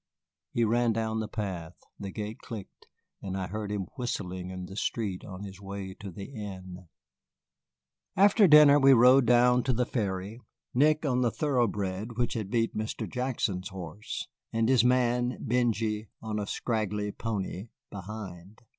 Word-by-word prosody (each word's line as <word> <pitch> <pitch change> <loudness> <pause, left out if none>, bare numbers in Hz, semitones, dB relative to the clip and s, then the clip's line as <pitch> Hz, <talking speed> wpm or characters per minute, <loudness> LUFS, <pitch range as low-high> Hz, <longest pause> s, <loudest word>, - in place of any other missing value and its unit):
He 120 - +1
ran 115 +1 +2
down 110 0 -1
the 110 - -2
path, 90 -6 -5 0.2
the 100 - -5
gate 105 +2 -5
clicked, 110 -5 -9 0.3
and 95 -1 -4
I 95 - -2
heard 105 +3 -4
him 100 -2 -2
whistling 95 -7 -3
in 95 -1 -6
the 95 - -10
street 105 -3 -2
on 95 0 -8
his 95 -1 -9
way 100 -1 -6
to 100 - -7
the 95 +2 -8
inn. 95 -5 -8 1.3
After 200 +1 +6
dinner 150 -2 +8
we 135 -1 +7
rode 125 +1 +6
down 125 +1 +5
to 130 - +2
the 125 +1 +1
ferry, 100 -2 -3 0.3
Nick 155 +4 +3
on 125 -3 +1
the 120 - +3
thoroughbred 110 -6 -1
which 120 -1 0
had 110 -5 -3
beat 115 +1 0
Mr. 110 +1 -3
Jackson's 120 -7 -2
horse, 95 +1 -6 0.2
and 115 +1 +1
his 130 -3 +5
man, 125 0 +2
Benjy, 110 -3 0
on 110 -1 -3
a 100 - -3
scraggly 105 -3 -2
pony 100 -2 -4 0.2
behind. 100 -1 -8
110 Hz, 155 wpm, -29 LUFS, 95-120 Hz, 1.3 s, dinner